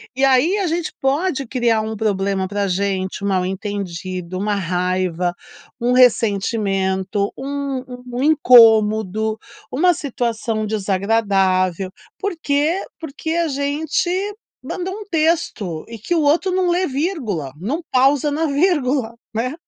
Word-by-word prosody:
E 270 - +3
aí 270 +9 +3
a 390 - 0
gente 335 0 -1
pode 275 +1 0
criar 230 -2 +1
um 220 0 -4
problema 195 -2 0
para 200 0 -1
gente, 190 +1 -2
um - - 0
mal-entendido, 185 -2 -3
uma 205 0 0
raiva, 180 -1 -1 0.5
um 240 +1 +1
ressentimento, 200 -4 +2
um 275 -1 -3 0.3
um 250 +3 -2
incômodo, 220 -7 +5 0.3
uma 350 +7 +3
situação 230 -6 -2
desagradável. 195 -3 +1 0.3
Porque 330 -2 0 0.2
porque 320 0 -5
a 340 -1 +1
gente 285 +4 -1 0.5
mandou 375 +1 -4
um 425 -1 -8
texto, 310 - 0
e 230 -1 -9
que 345 +11 -1
o 320 - +2
outro 325 +6 +2
não 370 -1 +1
lê 360 +1 +1
vírgula, 260 - -2
não 260 - -2
pausa 275 +3 +3
na 315 +2 0
vírgula, 280 -6 +1 0.2
né. 250 +4 -1
230 Hz, 125 wpm, -20 LUFS, 195-295 Hz, 0.5 s, incômodo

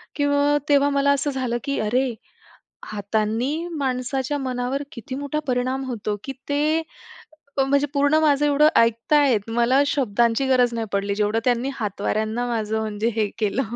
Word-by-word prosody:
किंवा 285 0 +2
तेव्हा 285 0 +4
मला 280 0 +3
असं 280 +1 0
झालं 255 -3 -2
की 280 - -1
अरे 245 +3 0 0.7
हातांनी 215 +6 -1 0.2
माणसाच्या 265 +1 -1
मनावर 255 +1 -2
किती 240 +2 -7
मोठा 285 +1 -3
परिणाम 255 +1 -1
होतो 215 -4 -3
की 270 - -4 0.2
ते 305 +3 +1 0.8
म्हणजे 280 +2 +2
पूर्ण 285 +2 +3
माझं 295 -2 +3
एवढं 295 +1 +5
ऐकताहेत. 230 -1 +3
मला 240 +4 +3
शब्दांची 240 -1 +1
गरज 250 -2 +3
नाही 225 -1 -2
पडली. 200 0 0
जेवढं 210 +2 0
त्यांनी 250 +2 +1
हातवाऱ्यांना 220 +2 -2
माझं 220 -1 -1
म्हणजे 215 +1 -2
हे 215 -1 +2
केलं. 220 +5 0
255 Hz, 145 wpm, -23 LUFS, 225-280 Hz, 0.8 s, एवढं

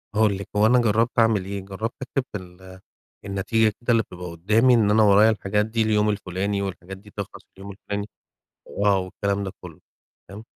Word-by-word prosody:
هأقول 105 -2 +3
لِك، 100 - -7
هو 105 - +4
أنا 125 +3 +5
جرّبت 115 +1 +1
أعمل 110 -4 +3
إيه، 100 +1 -4
جرّبت 100 +4 -5
أكتب 130 0 -2
في 105 - -2
ال 95 0 -13 0.5
النتيجة 100 +3 +1
كده 120 - 0
اللي 115 -1 +3
بتبقى 90 -2 -9
قُدّامي 110 +9 +3
إن 105 -3 +3
أنا 110 0 +5
ورايا 105 +2 +6
الحاجات 105 -1 0
دي 110 +1 -2
اليوم 105 -1 +2
الفُلاني 100 0 -2
والحاجات 95 -1 -6
دي 105 +2 -17
تخلَص 100 - -6 0.2
اليوم 100 +1 -9
الفُلاني، 100 +1 -5 0.6
وآه 100 -1 +1
والكلام 100 +2 -2
ده 95 - -4
كلّه، 85 -4 -11 0.5
تمام، 105 +3 -10
100 Hz, 185 wpm, -23 LUFS, 95-110 Hz, 0.6 s, ورايا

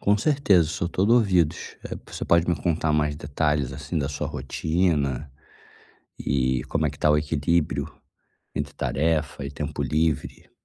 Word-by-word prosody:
Com 105 +1 +3
certeza, 105 - +3
sou 85 +1 -2
todo 100 +5 +2
ouvidos, 90 -9 +2
eh, - - -5
você - - -5
pode 85 0 +3
me 85 - +3
contar 80 +1 0
mais 75 -1 +1
detalhes 75 -2 0
assim 75 +4 -3
da 70 -2 -1
sua 75 - -3
rotina, 75 0 0 0.9
e 65 -1 0
como 80 +2 0
é - - 0
que 70 - -13
tá 75 - +3
o 75 - +5
equilíbrio 75 +2 0 0.7
entre 75 0 -3
tarefa 75 -1 0
e 70 - -4
tempo - - -4
livre? 80 -1 -1
75 Hz, 160 wpm, -25 LUFS, 70-85 Hz, 0.9 s, o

